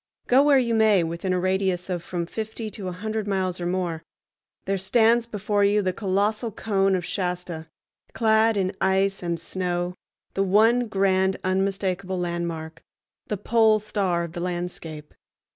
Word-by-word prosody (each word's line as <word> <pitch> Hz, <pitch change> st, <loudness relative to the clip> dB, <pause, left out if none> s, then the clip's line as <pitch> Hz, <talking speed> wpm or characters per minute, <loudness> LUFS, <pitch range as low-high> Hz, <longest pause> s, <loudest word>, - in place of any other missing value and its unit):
Go 255 Hz, +2 st, +5 dB
where 285 Hz, -1 st, +5 dB
you 240 Hz, -3 st, +1 dB
may, 215 Hz, -5 st, +4 dB
within 170 Hz, +3 st, -3 dB
a 180 Hz, -, +1 dB
radius 185 Hz, -1 st, 0 dB
of 180 Hz, -2 st, -2 dB
from 175 Hz, 0 st, -4 dB
fifty 220 Hz, +3 st, -5 dB
to 200 Hz, -3 st, -6 dB
a -, -, -2 dB
hundred 215 Hz, +3 st, -4 dB
miles 185 Hz, -2 st, -1 dB
or 175 Hz, -, -1 dB
more, 175 Hz, -3 st, -2 dB, 0.6 s
there 195 Hz, -, 0 dB
stands 230 Hz, +4 st, +3 dB
before 205 Hz, -2 st, 0 dB
you 205 Hz, +1 st, +3 dB
the 185 Hz, -1 st, 0 dB
colossal 210 Hz, +4 st, 0 dB
cone 195 Hz, -2 st, +1 dB
of 180 Hz, -2 st, -2 dB
Shasta, 180 Hz, -4 st, -3 dB, 0.4 s
clad 225 Hz, -1 st, +3 dB
in 190 Hz, 0 st, 0 dB
ice 195 Hz, +1 st, +2 dB
and 170 Hz, -1 st, -2 dB
snow, 175 Hz, 0 st, -2 dB, 0.4 s
the 195 Hz, -, 0 dB
one 220 Hz, +5 st, +4 dB
grand 190 Hz, -2 st, +2 dB
unmistakable 190 Hz, 0 st, -1 dB
landmark—the 170 Hz, +2 st, -5 dB
pole 220 Hz, +1 st, +3 dB
star 195 Hz, -5 st, -1 dB
of 170 Hz, -, -6 dB
the 175 Hz, -, -5 dB
landscape. 175 Hz, -4 st, -5 dB
190 Hz, 155 wpm, -24 LUFS, 180-215 Hz, 0.6 s, Go